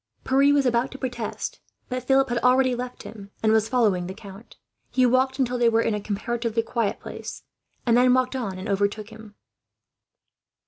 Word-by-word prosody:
Pierre 275 +2 +4
was 285 -1 +3
about 245 +1 +1
to 270 - -9
protest, 245 -4 -4 0.3
but 255 0 -3
Philip 270 +1 +2
had 240 0 0
already 255 +1 +3
left 250 0 -6
him, 200 -3 -10
and 220 - +4
was 220 0 +2
following 210 -8 +2
the 190 - -7
count. 200 +1 -13 0.3
He 255 - +3
waited 260 +2 +2
until 250 -2 0
they 235 -1 +4
were 230 0 +2
in 225 - 0
a 210 - -2
comparatively 230 +2 -2
quiet 225 -2 -1
place, - - -8 0.4
and 235 -2 +4
then 250 +1 +5
walked 255 0 0
on 205 -8 -3
and 185 - -6
overtook 205 +2 -1
him. 220 -1 -13
235 Hz, 185 wpm, -24 LUFS, 215-255 Hz, 0.4 s, then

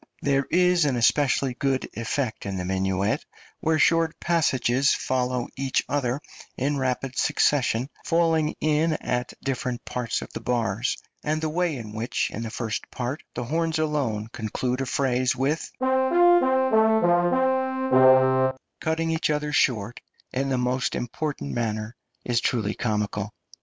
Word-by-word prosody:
There 135 -1 +1
is 180 0 +3
an 135 -3 +1
especially 135 +2 +2
good 135 +1 -1
effect 115 -1 -3
in 95 -1 -3
the 90 - -3
minuet 95 +5 0 0.4
where 160 0 +1
short 165 0 +2
passages 135 -6 +2
follow 125 -1 -1
each 135 -1 0
other 135 -2 -1 0.4
in 140 +2 0
rapid 130 0 -2
succession, 135 -4 +2 0.2
falling 165 -2 +1
in 155 +1 +2
at 125 -4 -2
different 125 -2 -3
parts 125 -2 -2
of - - -12
the - - -4
bars, 120 -1 -1 0.3
and 155 +1 0
the 155 0 -2
way 175 -2 0
in 110 -3 -8
which 115 +3 -2
in 110 - -5
the 115 - -4
first 110 -1 -4
part 130 +4 -4
the 120 - -3
horns 160 +5 -1
alone 135 -9 -1
conclude 125 +3 -2
a 135 - -2
phrase 130 -1 +1
with 140 +5 0
[See - - -9
Page 260 - 0
Image] 260 - +4 0.2
cutting 165 +1 -1
each 160 -1 0
other 150 0 -1
short 115 -4 +1 0.3
in 135 +1 -1
the 130 - +1
most 125 +1 0
impatient 145 - -3
manner, 110 -1 -3 0.3
is 120 -1 +1
truly 110 -4 0
comical. 105 -2 -2
130 Hz, 145 wpm, -25 LUFS, 120-160 Hz, 0.4 s, Image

